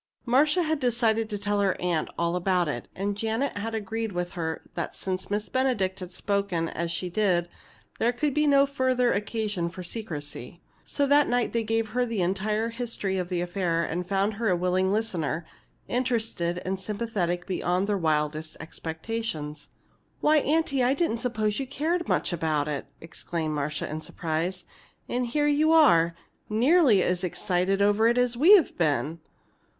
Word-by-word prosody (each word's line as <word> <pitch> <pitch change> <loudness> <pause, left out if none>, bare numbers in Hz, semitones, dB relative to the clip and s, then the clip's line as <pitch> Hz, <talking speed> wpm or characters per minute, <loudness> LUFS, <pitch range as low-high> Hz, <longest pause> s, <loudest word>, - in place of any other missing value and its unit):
Marcia 295 +8 +3
had 315 -2 0
decided 225 -3 +1
to 210 - -3
tell 205 0 -1
her 195 -2 +1
aunt 175 -3 0
all 170 +1 0
about 180 -1 +1
it. 120 -5 -4
And 200 +1 -2
Janet 225 +6 -1
had 225 +2 -3
agreed 220 0 -3
with 175 0 -2
her 160 -2 -4
that - - -4
since 185 0 -4
Miss 205 +1 -1
Benedict 240 -8 0
had 180 -1 -7
spoken 185 -3 -1
as 170 +1 -3
she 170 +2 -2
did, 180 -2 +1 0.5
there 235 - +3
could 280 +4 -1
be 300 +1 +2
no 280 -1 +6
further 260 -3 +1
occasion 205 -4 -2
for 185 +1 -8
secrecy. 165 - -7 0.2
So 285 - 0
that 285 +1 +4
night 245 0 0
they 230 -1 +1
gave 225 0 0
her 240 +3 -2
an 245 -2 -1
entire 210 +3 0
history 230 -5 -2
of 180 -1 -3
the 180 -2 -1
affair, 175 -2 0
and 175 +2 -3
found 200 +2 +1
her 220 +1 -1
a 180 - +3
willing 180 +2 +1
listener, 175 -7 -1 0.4
interested 225 -8 -1
and 190 +1 -2
sympathetic 195 -4 -2
beyond 180 0 0
their 205 0 0
wildest 155 -2 -1
expectations. 160 -1 -5 0.5
"Why, 305 +1 +4
Aunty, 295 -2 +1
I 255 +3 +3
didn't 280 -7 0
suppose 220 -3 -1
you'd 270 -2 -4
care 330 +6 0
much - - 0
about 155 -3 0
it!" 145 -2 -3
exclaimed 165 -1 -4
Marcia, 150 +1 -2
in 155 +1 -5
surprise. 170 +3 -3 0.4
"And 245 0 -1
here 295 +5 +1
you 300 +2 +3
are, 170 - +5 0.3
nearly 245 - +4
as 180 +1 0
excited 185 +2 0
over 205 +2 +4
it 240 +1 +2
as 245 -1 +2
we've 345 +7 +6
been." 160 0 0
200 Hz, 170 wpm, -27 LUFS, 175-240 Hz, 0.5 s, no